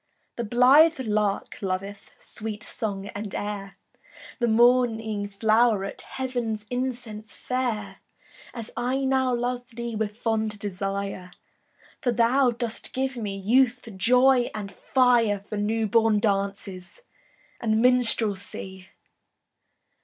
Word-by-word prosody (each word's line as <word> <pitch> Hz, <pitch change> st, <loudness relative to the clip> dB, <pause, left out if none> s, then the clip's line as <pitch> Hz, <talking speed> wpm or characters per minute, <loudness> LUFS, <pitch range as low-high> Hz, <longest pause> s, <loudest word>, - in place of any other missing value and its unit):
The 235 Hz, -, -3 dB
blithe 265 Hz, +8 st, +5 dB
lark 210 Hz, -4 st, -1 dB
loveth 195 Hz, +1 st, -4 dB
Sweet 215 Hz, -1 st, -7 dB
song 200 Hz, -3 st, -4 dB
and 205 Hz, -1 st, -6 dB
air, 205 Hz, -1 st, -5 dB, 0.6 s
The 240 Hz, -, +2 dB
morning 225 Hz, -3 st, +3 dB
flow'ret 215 Hz, 0 st, +2 dB
Heav'n's 240 Hz, -5 st, -4 dB
incense 240 Hz, -4 st, -4 dB
fair, 250 Hz, -4 st, -3 dB, 0.5 s
As 230 Hz, -3 st, -7 dB
I 255 Hz, +3 st, -1 dB
now 260 Hz, -1 st, +2 dB
love 245 Hz, 0 st, -2 dB
thee 235 Hz, -1 st, -4 dB
With 210 Hz, 0 st, -3 dB
fond 220 Hz, -2 st, -1 dB
desire, 195 Hz, -2 st, -4 dB, 0.7 s
For 245 Hz, -, +1 dB
thou 245 Hz, +3 st, +3 dB
dost 235 Hz, -1 st, -5 dB
give 265 Hz, 0 st, -1 dB
me 205 Hz, -4 st, -4 dB
Youth, 245 Hz, +4 st, +2 dB
joy, 250 Hz, +5 st, +4 dB
and 205 Hz, -2 st, -5 dB
fire, 230 Hz, -2 st, +2 dB
For 210 Hz, -, -4 dB
new 220 Hz, +2 st, 0 dB
born 220 Hz, 0 st, +3 dB
dances 200 Hz, -, -3 dB, 0.6 s
And 220 Hz, -2 st, +1 dB
minstrelsy. 215 Hz, -6 st, +1 dB
225 Hz, 110 wpm, -25 LUFS, 205-245 Hz, 0.7 s, blithe